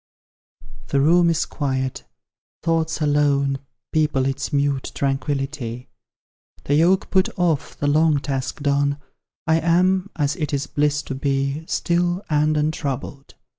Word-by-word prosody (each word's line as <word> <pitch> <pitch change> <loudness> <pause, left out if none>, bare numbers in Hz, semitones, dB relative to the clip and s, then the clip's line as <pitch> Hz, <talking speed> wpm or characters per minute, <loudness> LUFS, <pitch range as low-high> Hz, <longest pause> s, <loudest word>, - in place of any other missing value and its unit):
The 140 - +1
room 170 +4 +4
is 165 -1 +1
quiet, 130 -3 -3 0.6
thoughts 165 -1 0
alone 140 -2 +2 0.3
People 150 -4 +2
its 135 +2 -2
mute 140 -2 0
tranquillity; 135 -3 -2 0.7
The 145 - -1
yoke 175 +6 +3
put 190 -1 +3
off, 170 -5 0
the - - -3
long 155 +1 +3
task 135 +1 -4
done, 140 0 +1 0.5
I 160 0 +3
am, 185 +3 +2
as 145 -1 0
it 150 -4 -1
is 140 - -2
bliss 145 0 0
to - - -5
be, 140 +2 -1
Still 175 +2 0
and 150 +1 +2
untroubled. 145 -2 -3
145 Hz, 130 wpm, -22 LUFS, 140-160 Hz, 0.7 s, room